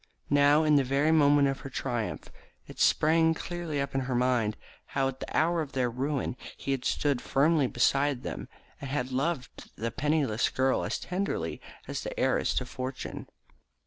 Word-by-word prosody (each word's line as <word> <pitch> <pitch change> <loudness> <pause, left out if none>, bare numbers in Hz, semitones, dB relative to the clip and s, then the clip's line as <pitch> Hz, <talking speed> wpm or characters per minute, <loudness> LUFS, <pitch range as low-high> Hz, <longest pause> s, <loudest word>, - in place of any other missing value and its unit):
Now, 145 +2 +5
in 150 -1 +4
the 140 - +4
very 140 +4 +2
moment 145 -2 +5
of 135 0 -2
her 135 - -8
triumph, 120 -4 -3 0.3
it - - -12
sprang 160 +1 +4
clearly 170 -4 -4
up 140 - -2
in 135 - 0
her 130 -1 -2
mind 120 -4 +1 0.4
how 135 -1 +3
at 135 - -8
the - - -4
hour 165 +2 +2
of 145 -3 -6
their 125 -2 0
ruin 135 +1 -2 0.2
he 140 - -4
had 130 -2 -2
stood 140 -4 +1
firmly 145 0 +2
by 135 +4 +2
them, 125 - -6 0.3
and 140 - -6
had 130 -2 -2
loved 135 +1 -3
the 115 +1 -3
penniless 145 -6 +1
girl 130 0 +1
as - - -1
tenderly 180 - -3 0.3
as - - -4
the - - -5
heiress - - +1
to 125 - 0
fortune. 130 +1 -6
140 Hz, 175 wpm, -29 LUFS, 130-150 Hz, 0.4 s, Now